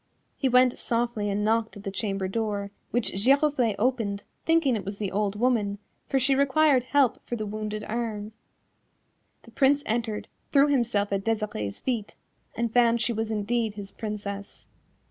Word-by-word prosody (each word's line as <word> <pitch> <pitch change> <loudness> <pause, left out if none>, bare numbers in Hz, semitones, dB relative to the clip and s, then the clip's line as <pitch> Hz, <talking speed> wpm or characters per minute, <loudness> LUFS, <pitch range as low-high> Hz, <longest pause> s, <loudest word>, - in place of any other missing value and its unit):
He 265 - 0
went 250 0 +4
softly 230 -3 -1
and 205 +1 0
knocked 225 0 +1
at 200 - -11
the 195 - -3
chamber 195 -2 -2
door, 205 -1 -2 0.2
which 240 -1 0
Giroflée 260 +1 +3
opened, 215 -4 0 0.2
thinking 325 -6 +3
it 210 - -3
was 200 +2 -5
the 200 -3 -3
old 205 0 0
woman, 220 -5 +1 0.3
for 270 - +2
she 270 +2 +3
required 275 -1 +3
help 270 -3 +2
for 240 - -2
the 215 -2 -3
wounded 215 0 -4
arm. 215 -2 -3 1.1
The - - -15
Prince 285 +1 +3
entered, 220 -1 -2 0.2
threw 285 0 +5
himself 230 -7 +1
at 195 0 -1
Desirée's 210 - -2
feet, 230 -5 -2 0.4
and 230 -1 -1
found 235 -1 +4
she 235 +1 +1
was 220 0 -2
indeed 220 0 -1
his 200 -1 -7
Princess. 200 -2 -6
225 Hz, 165 wpm, -27 LUFS, 205-250 Hz, 1.1 s, threw